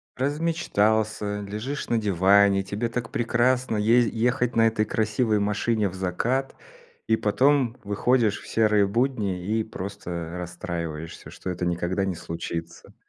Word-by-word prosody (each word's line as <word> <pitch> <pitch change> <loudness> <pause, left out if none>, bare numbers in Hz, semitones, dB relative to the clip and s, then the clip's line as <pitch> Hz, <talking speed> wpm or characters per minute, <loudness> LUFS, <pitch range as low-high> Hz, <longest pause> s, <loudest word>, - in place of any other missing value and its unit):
Размечтался, 110 -9 0
лежишь 110 +8 -5
на 115 - +2
диване, 100 0 +4
тебе 105 +5 -3
так 115 0 -4
прекрасно 125 +1 +1
езди 115 +3 +3
ехать 125 +1 +1
на 115 0 +5
этой 110 -1 +2
красивой 110 0 +1
машине 105 +1 0
в - - -11
закат, 105 +9 -1 0.5
и 110 - +4
потом 130 +3 +2
выходишь 105 +1 +1
в - - -13
серые 105 -2 +3
будни, 105 -5 -1
и 110 +2 0
просто 90 -5 -6
расстраиваешься, 85 -2 -6
что - - -7
это 90 0 -3
никогда 90 +2 -1
не 95 -2 -2
случится. 85 0 -6
105 Hz, 135 wpm, -25 LUFS, 95-120 Hz, 0.5 s, на